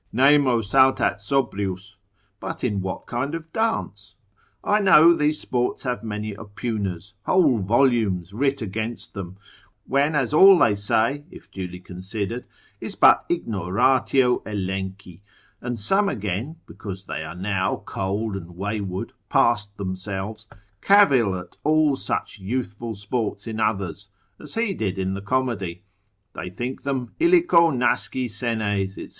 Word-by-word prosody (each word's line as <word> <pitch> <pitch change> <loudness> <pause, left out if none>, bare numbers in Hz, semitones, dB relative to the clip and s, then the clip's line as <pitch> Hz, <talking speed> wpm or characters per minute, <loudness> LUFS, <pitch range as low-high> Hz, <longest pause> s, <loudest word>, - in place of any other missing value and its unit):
Nemo 135 -1 +4
saltat 130 +5 +3
sobrius. 100 -6 -2 0.4
But 95 - -6
in 105 -6 0
what 95 0 -5
kind 130 +6 -3
of 165 0 -9
dance? 105 - -2 0.5
I 210 +1 +2
know 170 -4 +7
these 150 -1 +1
sports 125 -1 -2
have 125 -4 -3
many 105 -1 -4
oppugners, 100 -3 -5
whole 150 -11 +4
volumes 105 -5 +1
writ 135 +2 0
against 110 +3 -5
them; 95 -2 -7 0.5
when 140 +3 +1
as 135 -1 0
all 190 +4 +8
they 115 - +4
say 115 +8 0
(if - - -14
duly 90 -2 -6
considered) 100 +6 -5 0.3
is - - -6
but - - +6
ignoratio 125 - +2
Elenchi; 95 -2 -5 0.4
and 120 -1 -3
some 195 - +2
again, 105 - -3
because 95 -2 -8
they 80 - -5
are 80 +2 -7
now 95 0 -1
cold 100 +2 -2
and 85 -2 -8
wayward, 100 -1 -4 0.2
past 105 -4 +2
themselves, 100 +3 -5 0.3
cavil 135 - +5
at 90 -1 -11
all 155 -2 +3
such 125 - -4
youthful 110 +1 -4
sports 105 0 -3
in 110 -1 -5
others, 100 -2 -2 0.3
as 150 - -9
he 225 -3 0
did 100 - -3
in 95 0 -1
the 100 - -5
comedy; 100 -7 -2 0.5
they 90 - -6
think 120 +8 -5
them, 130 -4 -3
illico 335 - +5
nasci 125 0 0
senes, 105 -4 -2
&c. - - -8
110 Hz, 135 wpm, -23 LUFS, 95-130 Hz, 0.5 s, all